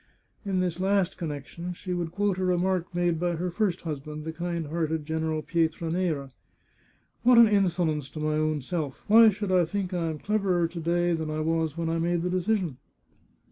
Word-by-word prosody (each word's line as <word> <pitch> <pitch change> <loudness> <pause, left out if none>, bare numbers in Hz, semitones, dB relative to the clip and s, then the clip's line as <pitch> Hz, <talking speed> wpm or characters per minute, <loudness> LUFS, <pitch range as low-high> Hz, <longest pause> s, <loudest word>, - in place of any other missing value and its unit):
In 195 -2 -1
this 180 -1 -1
last 195 -1 +1
connection 165 +2 -5
she 180 +1 -5
would 170 -2 -2
quote 200 -1 0
a - - -1
remark 180 0 +1
made 175 -2 0
by 175 0 0
her 180 +2 -2
first 190 -1 0
husband, 150 -1 -5
the 160 +1 -5
kind 170 0 -3
hearded 160 -1 -1
General 160 0 -2
Pietra 165 -1 0
nera. 160 -6 -1 0.5
" - - -38
What 245 +1 +5
an 230 -1 +9
insolence 175 -8 +1
to 155 - -8
my 155 0 0
own 155 -1 0
self! 150 -2 -4
Why 225 +1 +8
should 205 -1 -3
I 180 -1 +5
think 185 +2 -3
I 170 -2 -1
am 155 - -4
cleverer 190 -2 +1
to 170 - -7
day 175 +1 +1
than 160 -1 -2
I 155 0 -2
was 160 -1 0
when 165 -1 -1
I 165 0 0
made 170 0 0
the 180 - -1
de 185 - +1
cision 185 - 0
170 Hz, 205 wpm, -27 LUFS, 160-185 Hz, 0.5 s, an